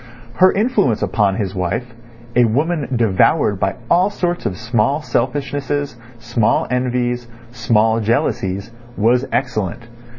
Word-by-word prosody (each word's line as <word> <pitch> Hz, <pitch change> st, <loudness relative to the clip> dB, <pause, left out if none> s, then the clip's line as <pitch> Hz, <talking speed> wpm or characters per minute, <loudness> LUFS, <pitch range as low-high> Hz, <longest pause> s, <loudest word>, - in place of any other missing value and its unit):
Her 185 Hz, 0 st, +6 dB
influence 195 Hz, -, +1 dB
upon 100 Hz, 0 st, +1 dB
his 100 Hz, -4 st, -3 dB
wife, 95 Hz, +7 st, -3 dB, 0.4 s
a 125 Hz, 0 st, +5 dB
woman 145 Hz, +5 st, 0 dB
devoured 110 Hz, -, +2 dB
by 95 Hz, 0 st, 0 dB
all 180 Hz, +7 st, +3 dB
sorts 175 Hz, -3 st, -2 dB
of 90 Hz, -, -4 dB
small 120 Hz, +6 st, 0 dB
selfishnesses, 145 Hz, +2 st, -2 dB, 0.2 s
small 120 Hz, -1 st, +1 dB
envies, 125 Hz, -1 st, -1 dB, 0.2 s
small 110 Hz, -1 st, +2 dB
jealousies, 100 Hz, -2 st, -1 dB, 0.3 s
was 120 Hz, +5 st, +2 dB
excellent. 120 Hz, -5 st, -2 dB
120 Hz, 120 wpm, -18 LUFS, 105-140 Hz, 0.4 s, Her